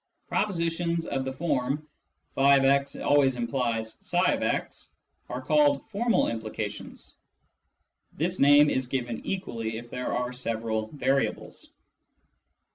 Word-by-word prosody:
Propositions 170 -3 -1
of 135 -1 -2
the 130 - -2
form 145 0 -1 0.3
" 75 0 -44
<f>x 140 0 +4
always 140 -3 +3
implies 115 -2 -2
tfix 180 +1 -1 0.2
" - - -43
are - - -5
called 290 -1 +3
" - - -32
formal 230 +3 +2
implications 110 -2 -6 0.5
"; - - -47
this 175 +4 -1
name 145 +1 +6
is 130 -1 0
given 120 -3 -3
equally 115 -12 -3
if 120 +1 -10
there 125 0 -3
are 125 0 -2
several 115 -3 -2
variables. 135 +2 -2
135 Hz, 120 wpm, -27 LUFS, 120-165 Hz, 0.5 s, name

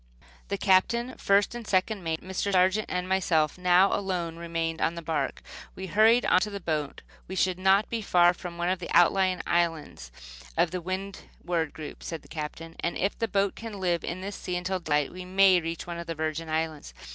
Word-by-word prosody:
The 200 - -2
Captain, 235 +7 +2
first 200 +2 +3
and 240 -2 -7
second 190 +1 0
mate, 160 -1 -2
Mr. 190 +2 -2
Sargent 190 +3 +3
and 180 0 -2
myself 170 -5 +1
now 180 +1 +4
alone 180 -4 -2
remained 165 -1 -3
on 165 - +1
the 170 - -7
bark. 160 -1 -2 0.3
We 190 - -6
hurried 220 +6 +4
into 185 +4 +3
the 200 -1 -5
boat. 155 -5 -3 0.2
"We 190 - -6
should 185 -1 +1
not 190 +2 +4
be 230 -1 -3
far 175 -3 +4
from 175 -1 -8
one 175 +1 0
of 185 0 0
the 175 - -7
outlying 185 +1 +4
islands 165 - -1 0.5
of 170 - +3
the 180 -1 -3
Windward 180 -3 -4
group," 155 -2 -8
said 165 -2 -6
the - - -17
captain; 165 +1 -7
"and 170 - -2
if 195 - 0
the 230 - 0
boat 195 -1 +1
can 220 -3 -8
live 175 -2 0
in 180 +2 -4
this 200 +1 -5
sea 180 - -4
until 185 +1 -2
daylight 150 -4 0
we 185 0 -7
may 185 0 +4
reach 165 0 -5
one 170 -1 -6
of 170 - -7
the 165 - -3
Virgin 155 +1 -3
Islands." 160 -1 -3
180 Hz, 205 wpm, -27 LUFS, 165-195 Hz, 0.5 s, now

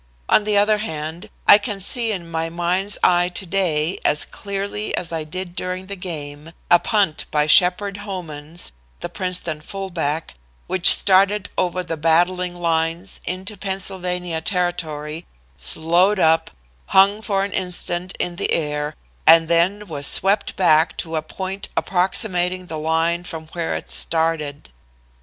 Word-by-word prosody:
On 210 - +4
the 210 -1 +2
other 210 +1 +3
hand, 160 +1 -6 0.2
I 205 - +9
can 205 -2 -4
see 230 +3 -1
in 170 -5 -6
my 165 0 -2
mind's 180 +4 0
eye 175 0 +4
to 190 +2 -5
day, 170 -3 -1
as 150 +1 +2
clearly 200 +1 -4
as 170 - -3
I 160 -1 -3
did 175 +3 -7
during 185 +1 -4
the 200 +1 -7
game, 155 -4 -8 0.2
a 175 - +7
punt 200 -8 0
by 150 -1 +1
Sheppard 185 +5 +4
Homans, 170 - -6 0.3
the - - -4
Princeton 180 -5 -2
fullback, 165 -4 -4 0.3
which 185 -2 +6
started 195 +1 +6
over 180 0 -1
the 165 -2 -5
battling 175 +3 +1
lines 165 +2 -2
into 190 +3 -5
Pennsylvania 180 -3 -3
territory, 165 -4 -3 0.3
slowed 170 - +2
up, 160 -2 +2 0.4
hung 200 +2 +4
for 195 -3 -1
an 200 - -7
instant 180 -1 0
in 175 -1 -3
the - - -2
air 150 -1 -2 0.3
and 165 0 +7
then 175 +5 +1
was 145 -6 0
swept 200 +2 +2
back 160 -3 +3
to 165 -1 -4
a 155 - 0
point 190 +5 -6
approximating 185 -1 0
the 160 -3 -6
line 165 +2 0
from 160 -3 -8
where 170 -1 -3
it - - -7
started. 160 - -1
175 Hz, 145 wpm, -20 LUFS, 160-195 Hz, 0.4 s, I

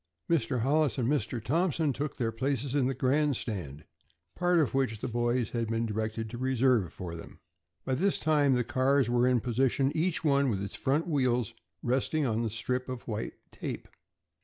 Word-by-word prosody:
Mr. 130 -7 +1
Hollis 145 0 +2
and 120 -3 0
Mr. 125 -4 0
Thompson 160 - +1
took 145 +3 -4
their 115 -3 0
places 130 +2 -2
in 140 -3 +2
the 135 - -1
grandstand, 125 - -1 0.5
part 175 0 +2
of 150 -8 +2
which 130 -5 0
the - - -4
boys 120 0 0
had 115 -1 -1
been 115 +1 0
directed 110 +1 -3
to 120 - -6
reserve 130 -6 +2
for 90 -3 -7
them. 85 - -10 0.5
By 130 - 0
this 190 +9 +2
time 145 -4 +3
the 125 - +1
cars 130 +1 +2
were 120 +1 +3
in 125 -2 +3
position, 130 +3 +1
each 165 +2 0
one 140 -3 +3
with 100 -5 -1
its 100 - -6
front 145 +5 0
wheels 125 - +1 0.3
resting 135 +5 +1
on 115 -2 0
the 115 - -1
strip 125 +4 -3
of 130 -2 -6
white 110 -1 -3 0.2
tape. - - -6
130 Hz, 185 wpm, -29 LUFS, 115-140 Hz, 0.5 s, time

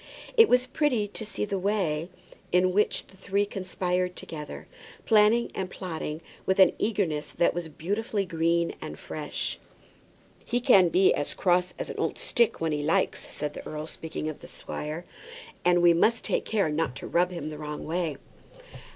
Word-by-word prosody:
It 450 -2 +7
was 250 0 +4
pretty 255 -5 +1
to 220 - -4
see 210 -1 -3
the 200 -2 -2
way 180 -5 0 0.4
in 180 +1 +3
which 210 +2 +1
the - - -19
three 200 +2 0
conspired 185 -2 -2
together, 150 -2 -7 0.4
planning 220 +2 +4
and 190 -1 -3
plotting 160 -4 -5 0.3
with 190 - +2
an 190 - +7
eagerness 180 -9 -1
that 170 - +2
was 170 -2 -4
beautifully 200 +6 -2
green 170 0 +1
and - - -6
fresh. - - -4 0.8
"He 240 - 0
can 200 -9 +6
be 185 +3 +5
as 145 - -3
cross 180 -1 +2
as - - -4
an - - -7
old - - -1
stick 235 -2 +1
when 165 -1 0
he 150 -1 -1
likes 155 +3 +1
it," - - -12
said 150 0 -3
the - - -8
earl, 155 0 -5
speaking 160 -1 -5
of 155 - -5
the - - -11
squire; 155 +4 -6 0.6
"and 175 0 +4
we 170 -1 +7
must 225 +7 +3
take - - 0
care 200 -7 +1
not 150 -4 -1
to 135 - -7
rub 175 +1 +2
him 170 -4 -5
the 150 - -8
wrong 150 -1 -5
way." 165 -3 -1
180 Hz, 180 wpm, -27 LUFS, 160-205 Hz, 0.8 s, It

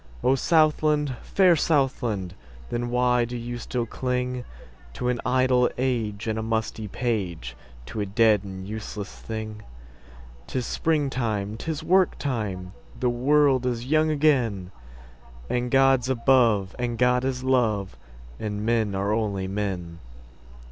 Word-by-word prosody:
O 130 - +4
Southland, 150 -1 +2
fair 185 -3 +4
Southland! 130 - 0 0.4
Then 120 0 -2
why 125 0 +2
do 120 +1 -4
you 120 +1 -5
still 120 0 -2
clingTo 125 +1 -2 0.7
an 120 - -3
idle 125 -1 +3
age 115 -4 -1
and 110 -1 -1
a - - -1
musty 110 -1 -2
page, 95 - -3 0.3
To 110 - -6
a - - -1
dead 105 0 +3
and 95 -1 -7
useless 105 -1 -6
thing?'Tis 60 - -8
springtime! 120 -11 -1
'Tis 155 +6 -4
work 185 0 +3
time! 100 -9 -3 0.3
The 125 - +2
world 135 +1 +3
is 120 -1 -2
young 155 +3 +2
again! 125 -12 +1 0.8
And 125 0 -1
God's 135 -1 +4
above, 115 -6 +3
and 120 -1 -2
God 125 +1 +3
is 130 -1 -2
love, 110 -7 +1 0.4
And 105 0 -3
men 110 -3 +1
are 100 +2 0
only 100 -4 -1
men. 95 -4 -4
120 Hz, 125 wpm, -25 LUFS, 105-130 Hz, 0.8 s, O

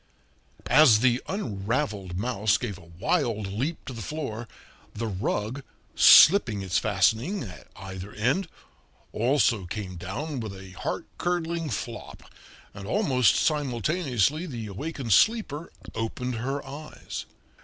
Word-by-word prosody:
As 125 -6 +6
the 125 0 +3
unraveled 105 - -2
mouse 105 -1 +1
gave 105 -7 -5
a 85 -2 -16
wild 115 - 0
leap 125 +12 -3
to 130 - -6
the 115 - -7
floor, 120 -3 -5 0.5
the 115 +2 -3
rug, 105 +5 -2 0.3
slipping 125 - +7
its 90 -3 +1
fastening 110 - +1
at 95 -6 -10
either 95 +1 -8
end, 135 - 0 0.7
also 115 -4 +2
came 95 -2 -5
down 130 - -4
with 105 -4 -6
a 95 -1 -11
heart 90 - -4
curdling 170 -2 -1
flop, 110 - -6 0.5
and 100 0 -9
almost 130 - +3
simultaneously 145 - 0
the 120 -7 -5
awakened 120 +3 -3
sleeper 205 - +2 0.2
opened 120 +2 -3
her 135 +5 -3
eyes. 150 +2 -8
120 Hz, 120 wpm, -26 LUFS, 100-150 Hz, 0.7 s, slipping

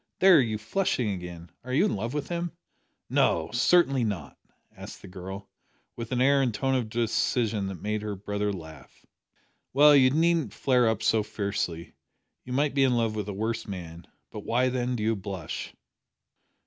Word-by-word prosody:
There, 185 -6 +7
you're 110 -3 -1
flushing 115 - -1
again! 90 -2 -7
Are 125 - -7
you 150 +10 +3
in - - 0
love 115 +7 -4
with 150 - -2
him?" 170 -1 -3 0.5
"No, 80 0 +1
certainly 135 0 +3
not," 95 -10 -4 0.4
answered - - -10
the - - -9
girl, 95 +2 -8 0.5
with 115 0 -7
an 125 - 0
air 140 +2 +4
and 130 -3 +1
tone 135 +5 -1
of 125 -4 0
decision 115 -2 0
that 95 -4 -7
made 105 0 -1
her 105 -1 -4
brother 105 +1 -2
laugh. 80 -7 -11 0.7
"Well, 145 +2 +7
you 130 -2 +6
needn't 165 +2 +1
flare 125 -3 +3
up 110 0 -2
so 110 - +3
fiercely. 100 -5 -3 0.5
You 125 - -10
might 140 +2 +1
be 140 -1 +3
in 125 -2 +3
love 115 -2 +1
with 105 -1 -4
a - - -3
worse 110 +3 -3
man. 85 -4 -8 0.2
But - - -6
why, 125 +2 +1
then, 125 0 -1
do 110 - -3
you 110 +1 +1
blush?" 95 -5 -6
115 Hz, 180 wpm, -27 LUFS, 100-130 Hz, 0.7 s, There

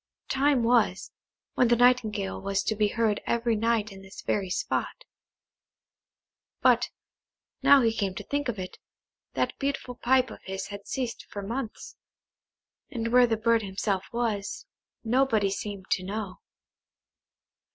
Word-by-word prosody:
Time 270 -2 +3
was, 230 -5 +2 0.4
when 250 - +3
the 240 - +4
nightingale 220 - +2
was 195 0 0
to 220 - 0
be 210 0 +2
heard 215 -1 0
every 235 -1 +1
night 225 -1 +1
in 195 0 -11
this 195 0 -11
very 195 -3 -1
spot; 180 - -2 1.6
but, - - +4 0.7
now 280 -2 +7
he 225 -1 +3
came 195 -4 -2
to - - -5
think 285 -2 -2
of 225 - -3
it, 185 -1 -7 0.6
that - - 0
beautiful 275 -3 -2
pipe 255 +1 +2
of - - -10
his 190 0 -5
had 200 -1 -8
ceased 250 -4 -4
for 200 - -6
months, 230 +2 -5 0.9
and 230 -5 -3
where 245 +1 +6
the 225 -1 0
bird 230 +1 +3
himself 195 -1 -2
was, 225 -4 -2 0.4
nobody 230 -4 +2
seemed 200 -1 -5
to - - +2
know. 195 0 -5
225 Hz, 140 wpm, -27 LUFS, 200-245 Hz, 1.6 s, now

